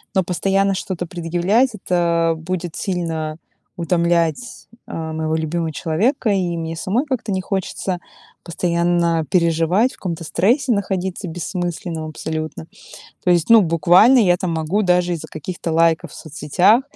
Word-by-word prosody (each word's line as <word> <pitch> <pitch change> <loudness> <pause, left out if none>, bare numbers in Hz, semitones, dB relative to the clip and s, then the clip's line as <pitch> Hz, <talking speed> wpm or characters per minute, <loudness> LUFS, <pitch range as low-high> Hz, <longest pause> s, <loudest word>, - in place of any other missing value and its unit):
но 190 - +3
постоянно 195 +2 +1
что-то 185 -2 -4
предъявлять- 175 +9 +1
это 170 -3 +1
будет 175 +1 -4
сильно 165 -5 -3 0.4
утомлять, 170 +4 0 0.2
а, 160 -1 -5
моего 160 0 -1
любимого 160 +1 -2
человека. 210 - 0
И 180 -3 0
мне 165 0 -4
самой 215 - 0
как-то 255 -7 -3
не 190 -1 0
хочется 190 -1 -3 0.4
постоянно 170 -1 0
переживать, 170 +6 +2
в - - -14
каком-то 170 -3 -4
стрессе 240 - +1
находиться 190 -2 -2
бессмысленном 175 -1 -4
абсолютно. 155 +1 -5 0.6
То 180 - +3
есть, 175 +2 +2
ну 225 -2 +8
буквально, 175 - +5
я 180 -5 +4
там 180 -1 -2
могу 160 +6 0
даже 180 -2 +2
из-за 165 - -6
каких-то 165 +2 -5
лайков 165 0 +2
в - - -12
соцсетях, 170 - +2
175 Hz, 140 wpm, -20 LUFS, 165-190 Hz, 0.6 s, ну